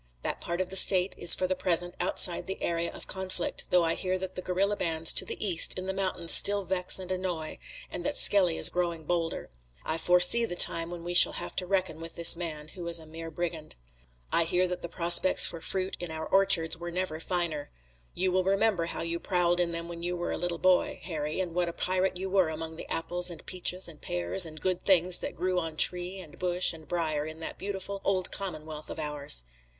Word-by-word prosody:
That - - -3
part 170 +1 -4
of 185 0 -3
the - - -5
State 185 0 +4
is 175 - +3
for 185 - -2
the 185 0 -1
present 175 -1 -1
outside 175 - 0
the 190 - -5
area 170 0 -2
of - - -9
conflict, 190 -2 -4
though 180 -1 +3
I 165 0 0
hear 185 0 -2
that 185 0 -6
the 185 - -6
guerilla 190 +3 -1
bands 165 -3 +1
to - - +3
the - - -5
east 185 -5 0
in 185 - -5
the 190 - -3
mountains 185 -3 0
still 200 0 +5
vex 180 0 0
and 185 -1 -7
annoy, 180 -4 -4 0.3
and - - -5
that 290 -3 -2
Skelly 185 -9 +4
is - - +7
growing 170 -2 -2
bolder. 165 - -3 0.3
I 160 +1 -2
foresee 180 +7 +6
the 200 -6 -3
time 165 -1 +5
when 175 -1 -8
we 175 +1 -5
shall 175 - +7
have - - -6
to 180 - -1
reckon 185 -4 -2
with 165 0 -9
this 170 -1 +5
man, 155 -3 -6
who 175 0 -9
is 170 0 +3
a 160 - -8
mere 165 +1 -9
brigand. 165 -2 -6 0.6
I 170 - +4
hear 180 +2 +1
that 180 0 -5
the 170 - -6
prospects 175 +2 +5
for 165 - -5
fruit 190 +2 -3
in 175 - 0
our 160 0 -6
orchards 190 -5 +3
were 175 +1 -7
never 175 -2 -3
finer. 165 -4 -3 0.5
You 185 +1 0
will 185 0 +1
remember 195 -2 +1
how - - -5
you 170 0 -3
prowled 175 -1 0
in 175 -1 +1
them 170 0 -5
when 170 -1 -9
you 175 +1 -3
were 175 - -4
a - - -3
little 175 -1 -3
boy, 185 +1 +1
Harry, 155 -1 -4
and 180 -3 -3
what 175 0 -1
a - - -7
pirate 185 +1 -1
you 190 +1 -5
were 190 -3 +1
among 160 +1 -7
the - - -9
apples 175 +2 -1
and 170 -2 -11
peaches 185 0 -2
and 160 -3 -13
pears 90 - +1
and 155 0 -11
good 185 +2 -2
things 180 -2 +3
that - - -6
grew 185 0 -1
on 160 -2 -6
tree 180 +3 +5
and 160 -5 -12
bush 180 0 +2
and 160 -1 -14
briar 155 -4 -2
in 155 0 -9
that - - -7
beautiful 195 0 -6
old 185 -2 0
commonwealth 155 -5 -5
of - - -7
ours. 145 - -1
175 Hz, 230 wpm, -28 LUFS, 165-185 Hz, 0.6 s, is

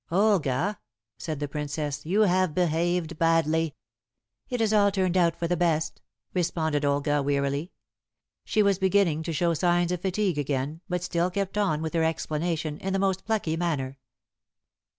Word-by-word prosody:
"Olga," 195 -1 +2 0.4
said 155 -4 -4
the 145 - -2
Princess, 145 0 -4
"you 200 +5 +2
have 185 -5 +2
behaved 170 -1 0
badly." 165 -1 +2 0.7
"It 245 -2 -2
has 220 -1 +2
all 205 -1 +5
turned 190 -2 0
out 170 -2 +3
for 170 - -1
the 175 - +1
best," 165 -2 0 0.3
responded 160 -4 0
Olga 145 +1 +1
wearily. 140 +3 -1 0.7
She 215 - +2
was 200 -2 +2
beginning 190 -5 +2
to 165 - -4
show 170 +2 +1
signs 175 +1 +2
of 180 -2 -2
fatigue 190 -3 0
again, 145 +3 -2
but 180 -1 -1
still 175 0 0
kept 195 +1 -3
on 185 -7 +1
with 160 - -3
her 165 -1 +2
explanation 160 -1 -2
in 190 0 -3
the - - +2
most 190 -1 0
plucky 210 -8 0
manner. 140 -6 -2
170 Hz, 160 wpm, -26 LUFS, 150-185 Hz, 0.7 s, all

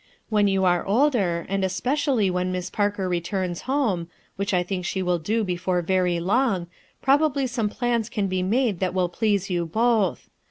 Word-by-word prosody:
When 210 -2 +3
you 195 -1 +1
aro 175 -2 +3
older, 200 - +2
and 195 0 -1
especially 245 +2 +1
when 180 0 -1
Miss 180 -1 -4
Parker 205 -2 0
returns 180 0 -2
homo, 220 -12 0 0.3
which 200 0 -2
I 180 -2 +2
think 180 0 -4
she 190 +1 -2
will 180 -1 +1
do 215 +8 0
before 180 -1 -1
very 180 -1 +1
long, 195 0 +1 0.4
probably 280 0 +3
some 235 -4 -1
plans 235 -1 -1
can 210 -4 -1
be 185 -1 -1
made 215 0 +1
that 185 -1 -1
will 180 -1 +1
pleaso 200 0 0
you 170 -1 -1
both. 220 0 +1
195 Hz, 175 wpm, -24 LUFS, 180-230 Hz, 0.4 s, When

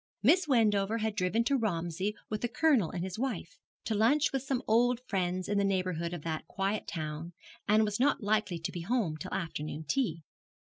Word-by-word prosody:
Miss 315 - +5
Wendover 220 -5 +3
had 220 -2 -1
driven 215 +4 +1
to 280 +4 +2
Romsey 190 -3 -1
with 215 -1 -3
the 240 - +1
Colonel 245 - +3
and 175 - -4
his 190 +2 -5
wife, 225 -10 -3 0.3
to 225 - 0
lunch 275 +9 +3
with 270 - 0
some 270 -1 -2
old 240 +2 +3
friends 185 -4 -1
in 205 0 +1
the - - +2
neighbourhood 185 -4 0
of 175 -4 -6
that 160 -2 -3
quiet 195 +2 -2
town, 155 +1 -5 0.3
and 215 +1 +5
was 210 +1 -2
not 275 -3 +2
likely 210 -3 +1
to 165 - -4
be 175 - -5
home 200 -4 0
till 155 - -7
afternoon 155 -3 -4
tea. 165 - 0
205 Hz, 195 wpm, -31 LUFS, 175-230 Hz, 0.3 s, Miss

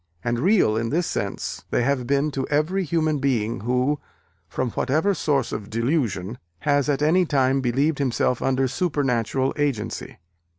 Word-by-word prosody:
And 120 0 0
real 180 - +3
in 115 0 -1
this 170 +6 +1
sense - - -3
they 120 - +1
have 130 -2 0
been 140 +2 +1
to 135 -1 -3
every 155 +7 +1
human 155 -2 0
being 120 -5 0
who, 125 +5 0 0.5
from 125 +5 -2
whatever 155 - +1
source 140 -8 0
of 105 -1 -5
delusion, 115 - -1 0.2
has 145 -1 +2
at 145 0 +1
any 175 +5 +4
time 135 -4 +2
believed 140 +5 +1
himself 125 -2 0
under 135 0 +1
supernatural 135 -4 0
agency." 130 -7 -2
135 Hz, 155 wpm, -23 LUFS, 120-150 Hz, 0.5 s, any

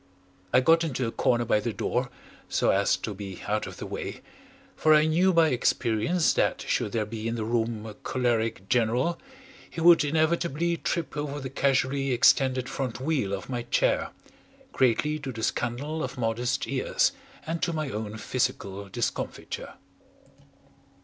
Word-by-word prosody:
I 125 - +5
got 165 +5 +4
into 130 -6 -1
a 115 - -2
corner 120 0 +1
by 105 - +3
the 115 +2 -2
door, 125 +3 -1 0.4
so - - +2
as 95 -2 +2
to 105 +3 -5
be 100 -2 -8
out 105 0 -1
of - - -9
the - - -6
way, - - -6 0.5
for 155 0 +5
I 150 0 +5
knew 175 +4 +3
by 165 -2 +4
experience 120 +5 +1
that - - +1
should 105 - 0
there 110 -2 0
be 110 +1 -5
in 115 - -1
the 110 -2 -3
room 115 -1 -1
a 110 - -7
choleric 115 -4 -1
general, 125 +9 +1 0.5
he - - -7
would 170 -1 +7
inevitably 160 +2 +1
trip 170 0 -2
over 145 -1 -3
the 130 -2 -6
casually 135 0 +1
extended 130 +1 +3
front 125 -4 -4
wheel 135 -8 0
of 100 -1 -4
my 125 -2 -3
chair, - - +1 0.6
greatly 135 +5 +2
to 135 -3 -5
the 110 -2 -6
scandal 140 +9 -2
of 130 - -5
modest 120 +2 -1
ears 135 - +1 0.3
and 165 +1 -3
to 180 -1 +1
my 155 -4 -3
own 105 0 -4
physical 100 -6 -2
discomfiture. 115 +4 -4
125 Hz, 165 wpm, -27 LUFS, 115-150 Hz, 0.6 s, would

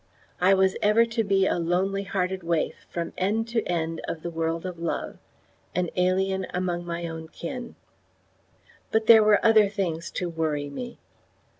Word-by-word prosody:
I 185 +2 +5
was 190 0 +3
ever 215 +2 +5
to 225 0 -1
be 195 -2 +2
a 175 - +1
lonely 185 +4 0
hearted 190 -1 -2
waif 165 -2 -2
from 170 -1 -4
end 215 +5 0
to 230 -1 +1
end 165 -2 -2
of 160 - -5
the 170 - -4
world 165 +1 -2
of 180 -2 -5
love 170 - -3 0.6
an 180 -1 0
alien 190 +1 +1
among 175 -1 -2
my 170 0 -3
own 160 -1 -7
kin. 235 +10 -7 1.2
But 220 0 +2
there 220 -1 +8
were 210 0 +4
other 215 -3 +6
things 175 -5 -3
to 180 - -2
worry 155 -4 -2
me. 240 - -7
185 Hz, 165 wpm, -26 LUFS, 170-200 Hz, 1.2 s, there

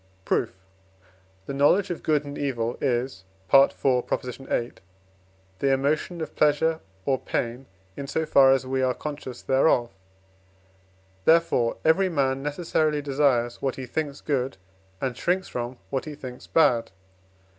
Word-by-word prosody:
Proof. - - +1 0.9
The - - -5
knowledge 180 +8 +3
of 175 - -4
good 150 -2 +1
and 145 0 -7
evil 120 -5 -2
is 125 -6 -1 0.3
(IV. 135 0 +8
viii.) 125 -1 -1 0.9
the 135 - +2
emotion 150 +5 0
of 155 - -6
pleasure 160 +2 +2 0.3
or 135 -2 +1
pain, 120 +3 -3 0.3
in 140 - -6
so 160 +3 -1
far 135 -3 +6
as 135 -1 +2
we 130 0 -1
are 130 -1 +1
conscious 145 -4 -7
thereof; 130 -3 +2 1.3
therefore, 160 -8 +3
every 185 +4 +4
man 135 -4 0
necessarily 150 0 0
desires 135 -4 +1
what 135 -2 -1
he 130 - -6
thinks 145 +1 -4
good, 135 -5 -1 0.4
and 130 +1 -2
shrinks 185 +2 0
from 120 +1 -5
what 135 - -2
he 150 -1 -7
thinks 130 -3 -9
bad. 120 -8 +3
135 Hz, 135 wpm, -25 LUFS, 125-150 Hz, 1.3 s, IV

